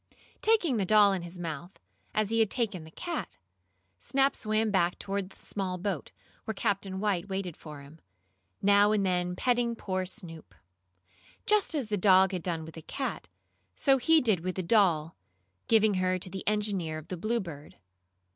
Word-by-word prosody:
Taking 385 - +3
the 205 - +1
doll 205 0 +6
in 190 - -2
his 175 +1 -8
mouth, 170 +1 -6 0.3
as 215 0 0
he 225 - +2
had 220 -2 +3
taken 210 -9 -2
the - - -12
cat, 340 - -5 0.6
Snap 275 +1 +1
swam 215 0 0
back 175 -3 +2
toward 195 -1 -3
the - - -17
small 190 -2 -4
boat, 185 -5 -3 0.3
where 220 - -3
Captain 195 -2 -1
White 200 -2 -1
waited 190 -4 -3
for 150 -3 -10
him, 145 +3 -15 0.6
now 205 +1 +5
and 205 -2 +1
then 180 -1 0
petting 240 +1 +1
poor 185 -4 -3
Snoop. 170 -5 -7 0.9
Just 420 -5 +2
as 265 -8 -2
the 210 - 0
dog 190 -1 +5
had 185 -2 -3
done 165 -2 -3
with 160 - -10
the 160 - -9
cat, 265 - -4 0.5
so 270 -2 +3
he 320 +5 +5
did 215 -7 +2
with 185 +2 -4
the 185 - -2
doll, 170 -6 +2 0.5
giving 220 -2 +4
her 185 -1 +1
to 185 0 -5
the 190 0 -7
engineer 205 -7 0
of 155 - -10
the 185 - -4
Bluebird. 175 -7 -4
195 Hz, 175 wpm, -29 LUFS, 175-220 Hz, 0.9 s, doll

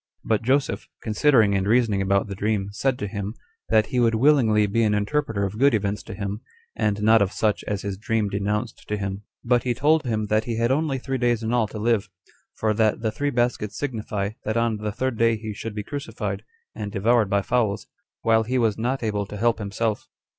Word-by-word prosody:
But 110 -2 +1
Joseph, 135 +5 0 0.2
considering 110 -1 +3
and 95 0 0
reasoning 110 -3 +3
about 100 0 +2
the 100 - -6
dream, 100 0 -1
said 130 +4 0
to 105 - -3
him, 100 +1 -5 0.3
that 110 -1 +4
he 125 - +2
would 115 -2 +3
willingly 115 -5 +4
be 105 +3 0
an 105 -2 +3
interpreter 105 0 0
of 100 +3 -5
good 140 -2 +5
events 100 -1 -1
to - - -7
him, 100 +1 -4 0.3
and 105 0 0
not 110 0 +6
of 100 -1 +2
such 105 -2 0
as 105 -2 -3
his 100 -1 -4
dream 110 -1 0
denounced 105 +3 -2
to 105 - -1
him; 100 0 -4 0.2
but 120 0 +3
he 125 -1 -1
told 155 +4 +3
him 110 -4 -1
that 110 +1 +1
he 115 -2 -2
had 115 +2 +1
only 145 0 +1
three 130 +1 -3
days 120 -2 +1
in 110 +2 -1
all 120 -3 +2
to 110 - -8
live, 110 -2 +1 0.5
for 110 -1 +1
that 110 0 +1
the 110 -1 0
[three] 145 +7 -1
baskets 120 -5 -1
signify, 105 -7 -3
that 110 +2 -1
on 115 -2 +1
the 105 0 -3
third 125 +2 -2
day 115 -1 +3
he 110 0 -6
should 105 +1 -6
be 105 - -3
crucified, 145 +6 -5 0.3
and 105 -1 -5
devoured 110 +1 +2
by 100 0 +1
fowls, 110 -2 0 0.4
while 110 0 +4
he 125 +4 -1
was 110 -3 +1
not 125 +3 -1
able 105 -2 -1
to 105 - -7
help 115 +2 +2
himself. 105 +1 -2
110 Hz, 220 wpm, -24 LUFS, 105-120 Hz, 0.5 s, not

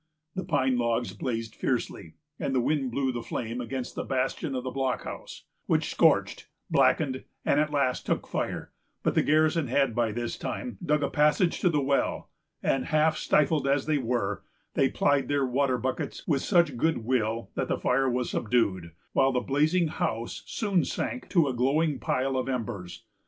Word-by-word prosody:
The 190 - -3
pine 130 -7 +1
logs 115 -3 0
blazed 115 -3 -3
fiercely, 105 -11 -3 0.2
and 135 - -1
the - - +4
wind 135 +1 0
blew 130 +2 0
the 120 -1 -4
flame 115 +1 -4
against 125 +1 -4
the - - -3
bastion 135 +3 -1
of 125 - -2
the 130 - -4
blockhouse, 130 0 -4 0.2
which - - +1
scorched, - - +2 0.2
blackened, 130 -4 +2 0.2
and 140 - +3
at 150 0 +2
last 140 -4 0
took - - 0
fire; - - -3 0.3
but - - +2
the - - +4
garrison 155 0 +2
had 135 0 +2
by 115 -1 +1
this 120 +2 -4
time 120 -6 -5
dug 150 0 +1
a - - 0
passage 150 +4 +3
to 180 - +3
the 150 -4 +1
well, 140 0 0 0.3
and, 135 - +1
half 155 0 +3
stifled 150 -2 +2
as 140 0 +2
they 155 -2 +1
were, 115 -5 -1 0.3
they 135 - +3
plied 145 -1 +2
their 145 -1 +1
water 130 0 +1
buckets 130 +2 -3
with 140 -5 +2
such 170 -9 +3
good 155 -4 0
will 115 -2 0
that - - -2
the - - 0
fire 130 +1 +2
was 125 0 -1
subdued, 100 -8 0 0.2
while 135 0 +4
the 125 - +1
blazing 155 +7 +2
house 115 -5 -3
soon 200 -5 +1
sank 255 - -3
to 170 -6 +3
a 130 - -1
glowing 140 +4 +1
pile 135 +1 0
of 130 - -1
embers. 115 -7 -4
130 Hz, 180 wpm, -28 LUFS, 120-150 Hz, 0.3 s, the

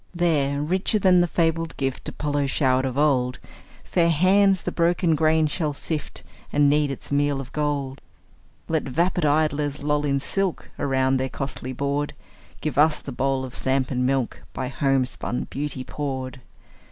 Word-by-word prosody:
There, 145 -5 +1
richer 190 +7 +1
than 185 -3 +5
the 175 - +2
fabled 165 -1 0
gift 135 -1 -2
Apollo 145 -2 -1
showered 130 -2 +2
of 130 0 -3
old, 130 -4 +2 0.5
Fair 170 -1 +2
hands 190 +4 +4
the - - -2
broken 170 0 +2
grain 155 0 +3
shall 150 0 -1
sift, 150 +1 -4 0.3
And 145 0 +4
knead 145 0 +3
its 135 - -7
meal 145 -1 +1
of 130 -2 -7
gold. 145 -3 -2 0.7
Let 160 -1 +1
vapid 170 +4 +1
idlers 145 -1 +1
loll 150 0 +1
in 140 -1 +1
silk 195 +5 -2
Around 130 -1 +2
their 130 0 -1
costly 135 -1 -5
board; 140 +2 -2 0.5
Give 145 -3 -1
us 155 0 +4
the 140 - -8
bowl 135 +1 0
of 125 - -9
samp 130 0 0
and 125 -1 0
milk, 130 -2 0
By 130 -1 -3
homespun 135 -3 -1
beauty 140 -2 -3
poured! 130 -2 -5
145 Hz, 160 wpm, -24 LUFS, 135-160 Hz, 0.7 s, than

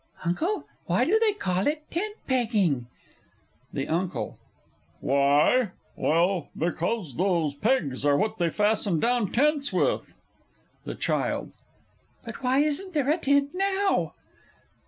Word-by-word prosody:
Uncle, 330 - -1 0.2
why - - +2
do 430 +6 +3
they 445 -1 +3
call 185 - -1
it 300 +1 -1
tent 415 +5 -2
pegging? 210 - +1 0.8
THE 135 -1 -2
UNCLE. 175 +2 -2 0.6
Why? 145 - +3 0.2
Well, 170 +1 +1
because 170 - -2
those 170 -5 +1
pegs 145 - 0
are 145 -1 +4
what 215 +3 -1
they 170 -1 +2
fasten 205 -2 +1
down 235 -2 +1
tents 290 +2 +2
with. - - 0 0.7
THE - - -5
CHILD. - - -1 0.7
But - - -8
why 260 +2 +3
isn't 315 +6 -2
there 290 -1 +2
a 315 - +2
tent 280 -1 +2
now? 390 +1 0
220 Hz, 125 wpm, -26 LUFS, -, 0.8 s, are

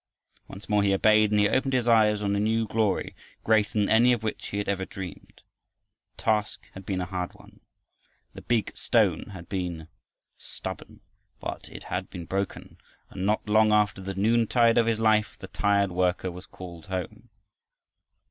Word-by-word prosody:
Once 95 - -11
more 105 -1 +2
he 100 -1 +3
obeyed, 110 +1 +4
and 105 0 +2
he 105 - +4
opened 130 +4 0
his 125 -2 +1
eyes 105 -2 +4
on 100 0 0
a - - 0
new 110 +2 +1
glory 110 -3 0 0.3
greater 110 -2 +2
than 105 -1 +2
any 120 +3 +5
of 115 -2 -3
which 110 - -4
he 100 - -5
had 100 - -2
ever 100 -1 -1
dreamed. 95 -3 -9 0.7
The - - -13
task 110 -1 0
had 95 0 -11
been 95 -2 -1
a - - -2
hard 90 -1 -4
one. - - -18 0.7
The - - -10
"big 115 -3 -1
stone" - - +1
had 95 -4 -10
been 90 -4 -4 0.5
stubborn, - - -8 0.4
but - - -6
it - - -10
had 90 +1 -4
been 85 -3 -8
broken, 95 +2 -4 0.3
and 95 0 -3
not 105 0 0
long 110 0 +4
after 105 -2 +2
the 95 0 -5
noontide 115 +3 +3
of 115 - +2
his 115 -1 +1
life 110 -1 +2
the 100 - -9
tired 100 -1 +1
worker 90 0 0
was 90 +2 -11
called 85 -2 -11
home. 95 -3 -5
105 Hz, 180 wpm, -26 LUFS, 95-110 Hz, 0.7 s, any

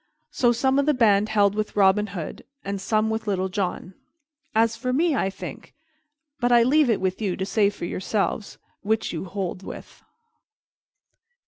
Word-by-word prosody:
So 240 -2 +3
some 265 +3 +2
of 280 - +1
the 300 - +3
band 210 -3 +3
held 205 -2 +3
with 215 0 -3
Robin 205 +1 +4
Hood 180 -5 -7 0.2
and 200 0 -3
some 215 +2 +1
with 220 0 -3
Little 190 -2 0
John. 185 -1 -3 0.6
As 225 +1 +3
for 255 +1 -3
me, 310 +3 +2
I 195 - 0
think 195 - -9 0.6
But 245 -1 +1
I 240 -1 +6
leave 285 +2 +3
it 225 - +2
with 185 +2 -2
you 195 -4 -1
to 190 - -2
say 200 +1 +2
for 205 -4 -7
yourselves 200 +3 -2 0.2
which 220 -1 -1
you 165 +2 -4
hold 190 -1 -4
with. - - -10
210 Hz, 175 wpm, -24 LUFS, 195-235 Hz, 0.6 s, I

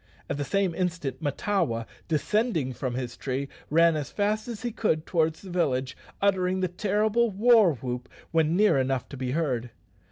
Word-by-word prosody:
At - - -2
the 145 - -1
same 195 +2 0
instant 170 -7 -2
Mahtawa, 145 - 0 0.2
descending 165 - 0
from 125 0 -3
his 125 -2 -4
tree, 135 +1 -3 0.2
ran 165 +1 +5
as 150 -2 -3
fast 215 +2 0
as 235 -2 -6
he 240 - -1
could 160 -8 0
towards 160 -1 0
the 190 - -8
village, 130 -7 0 0.2
uttering 190 -2 +2
the 185 - +2
terrible 210 +5 +1
war 215 -3 +5
whoop 125 0 -5 0.2
when 160 0 +2
near 205 -7 +4
enough 130 -1 0
to 140 - -8
be 125 0 -2
heard. 130 -7 -1
165 Hz, 170 wpm, -27 LUFS, 135-200 Hz, 0.2 s, ran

